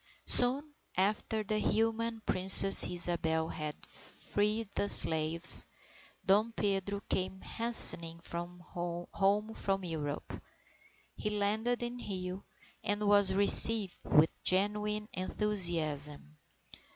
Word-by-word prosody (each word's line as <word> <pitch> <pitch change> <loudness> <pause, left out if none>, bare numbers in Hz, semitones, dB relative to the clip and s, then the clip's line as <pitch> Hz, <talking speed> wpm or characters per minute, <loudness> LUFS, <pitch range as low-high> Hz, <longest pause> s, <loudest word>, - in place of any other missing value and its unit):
_ - - -34 0.2
Soon 275 +5 0 0.2
after 210 +3 -4
the 215 +1 -5
humane 225 +1 -5
Princess 190 +1 +9
Isabel 165 -2 -3
had 150 -1 -9
freed 210 +2 -7
the 205 - -5
slaves, 160 +2 +3 0.6
Dom 210 +4 -2
Pedro 200 -1 -6
came 190 0 -6
hastening 170 -8 +5
home 175 +4 -7
from 195 -3 -6
Europe. 150 -4 -9 0.7
He 210 - -7
landed 215 +4 -5
in 240 +1 -8
Rio, 185 -4 -9 0.4
and 205 0 -5
was 205 -2 0
received 200 0 +2
with 155 +2 -1
genuine 210 +2 -3
enthusiasm. 165 - -5
195 Hz, 100 wpm, -27 LUFS, 175-210 Hz, 0.7 s, Princess